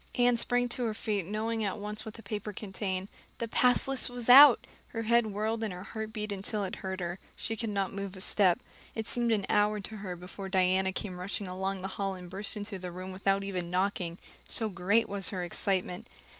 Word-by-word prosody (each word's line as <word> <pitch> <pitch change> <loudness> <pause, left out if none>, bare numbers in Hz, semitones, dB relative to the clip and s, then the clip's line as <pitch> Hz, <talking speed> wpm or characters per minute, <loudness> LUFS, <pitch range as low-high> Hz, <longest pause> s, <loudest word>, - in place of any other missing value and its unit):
Anne 245 0 +4
sprang 245 +1 +2
to 245 +1 -3
her 220 -2 -1
feet, 205 -5 -1
knowing 220 +2 -1
at 200 -1 -1
once 210 +1 -5
what 220 - -7
that 225 - -12
paper 210 -1 -4
contained. 190 -2 -3 0.3
The 230 - -2
pass 250 +3 +3
list 270 -2 -1
was 245 0 +2
out! 275 0 +10 0.3
Her 225 - -2
head 235 0 +4
whirled 215 +2 -1
and 215 - -1
her 180 0 -7
heart 220 +1 -5
beat 210 -1 -3
until 200 +1 -2
it 190 - -4
hurt 190 -1 -4
her. 175 +1 -3 0.2
She 225 - -2
could 225 0 -3
not 200 -2 -1
move 200 -1 -5
a - - -8
step. 185 -3 +4 0.4
It 220 - -2
seemed 235 0 0
an 205 -3 +2
hour 210 0 +3
to 215 +2 -7
her 190 -3 -5
before 185 +2 -8
Diana 190 0 +3
came 185 -2 -4
rushing 190 +2 -3
along 190 +1 -3
the - - -1
hall 195 -1 -1
and 180 -1 -10
burst 200 +3 -1
into 205 -1 -5
the 180 0 -5
room 185 +2 -6
without 195 +1 +1
even 180 -3 -3
knocking, 180 -2 -1 0.3
so 220 -2 +1
great 200 +5 +2
was 200 -1 +2
her 185 -3 -3
excitement. 180 0 0
200 Hz, 220 wpm, -30 LUFS, 185-220 Hz, 0.4 s, out